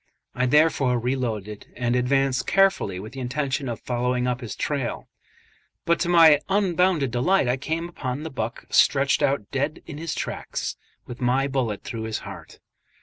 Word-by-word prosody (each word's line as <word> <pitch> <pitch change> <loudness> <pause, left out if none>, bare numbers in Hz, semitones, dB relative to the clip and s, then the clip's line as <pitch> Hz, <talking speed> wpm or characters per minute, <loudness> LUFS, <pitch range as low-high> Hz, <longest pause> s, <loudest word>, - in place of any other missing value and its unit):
I 125 +1 0
therefore 140 -3 +3
re 125 +3 0
loaded, 105 -5 -4
and 120 -1 0
advanced 130 +1 +1
carefully 195 - +2
with 110 +5 -9
the 135 - -7
intention 135 +1 -2
of 115 - -4
following 125 0 -1
up 125 0 -1
his 115 - -6
trail; 140 -5 -3 0.8
but 170 0 +2
to 175 - 0
my 165 -4 +7
unbounded 180 - +2
delight 135 +6 +2
I 125 +2 +1
came 160 +5 -3
upon 140 -4 -5
the 160 - -6
buck 120 -2 -4
stretched 140 0 +4
out 135 -7 0
dead 145 +3 -2
in 150 -2 -8
his 165 0 -3
tracks, - - -4 0.3
with 120 +1 -9
my 130 +2 +2
bullet 125 -7 -2
through 110 -1 -5
his 110 -1 -2
heart. - - -10
130 Hz, 170 wpm, -24 LUFS, 125-150 Hz, 0.8 s, my